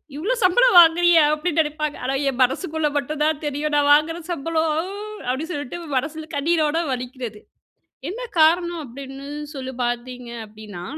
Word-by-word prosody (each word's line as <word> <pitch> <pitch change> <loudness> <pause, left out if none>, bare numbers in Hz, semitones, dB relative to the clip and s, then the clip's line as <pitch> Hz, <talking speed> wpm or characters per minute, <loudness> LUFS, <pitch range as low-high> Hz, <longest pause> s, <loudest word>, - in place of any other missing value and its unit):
இவ்வளோ 365 +11 -1
சம்பளம் 480 +5 +5
வாங்குறியா 340 0 +6
அப்டின்னு 315 +1 -1
நெனைப்பாங்க. 305 -1 -3
ஆனா 270 +1 0
என் 265 -1 -5
மனசுக்குள்ள 300 +4 +1
மட்டும் 300 +1 -3
தான் 310 -1 +1
தெரியும். 295 +1 -2
நான் 290 -1 +3
வாங்குற 310 +3 +2
சம்பளம் 320 0 0 0.6
அப்டின்னு 300 +7 -2
சொல்ட்டு 290 0 -5 0.2
மனசுல 315 +4 -4
கண்ணீரோட 310 +1 +1
வலிக்கிறது. 250 -3 -5 0.7
என்ன 460 +6 -6 0.2
காரணம் 340 +1 +3
அப்டின்னு 270 +2 -9 0.3
சொல்லி 260 -1 -5
பார்த்தீங்க 245 0 -4 0.2
அப்டின்னா, 210 -4 -10
300 Hz, 135 wpm, -22 LUFS, 260-325 Hz, 0.7 s, வாங்குறியா